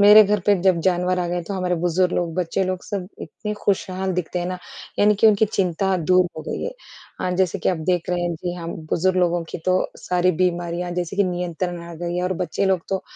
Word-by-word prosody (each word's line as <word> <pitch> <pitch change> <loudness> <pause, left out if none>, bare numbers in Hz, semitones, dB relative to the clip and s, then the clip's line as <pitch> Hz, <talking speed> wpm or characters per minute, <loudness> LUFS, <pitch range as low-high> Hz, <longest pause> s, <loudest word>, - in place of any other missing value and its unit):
मेरे 210 +1 +10
घर 205 0 +1
पे 205 - +6
जब 185 -3 +4
जानवर 180 0 +2
आ 180 - 0
गए 175 0 -1
तो 200 - -2
हमारे 180 -1 0
बुजुर्ग 180 +1 +2
लोग, 170 -2 -1
बच्चे 180 +1 0
लोग 185 0 -2
सब 190 -3 -4
इतने 210 - -5
खुशहाल 190 -1 0
दिखते 180 0 -2
हैं 175 - -2
ना, 185 0 -3 0.4
यानी 210 +1 +5
कि 210 - +4
उनकी 215 0 +5
चिंता 190 +1 +1
दूर 185 0 +6
हो 155 - -5
गई - - -3
है। - - -2 0.5
अ, 180 - 0
जैसे 190 +1 +2
कि - - 0
आप 185 - +2
देख 180 -1 0
रहे 180 0 0
हैं, 175 -1 -1
जी 175 +2 -4
हाँ, 170 -2 -6 0.2
बुजुर्ग 185 +2 +2
लोगों 175 -1 +2
की - - -5
तो 185 0 +4 0.2
सारी 180 0 +1
बीमारियाँ 175 0 -1
जैसे 175 +2 -5
कि 200 - +4
नियंत्रण 175 -1 -3
आ 170 0 -9
गई 175 +1 -3
हैं। 180 - 0
और 185 - 0
बच्चे 175 +3 -1
लोग 190 -2 +2
तो 190 -1 -1
180 Hz, 235 wpm, -22 LUFS, 175-190 Hz, 0.5 s, मेरे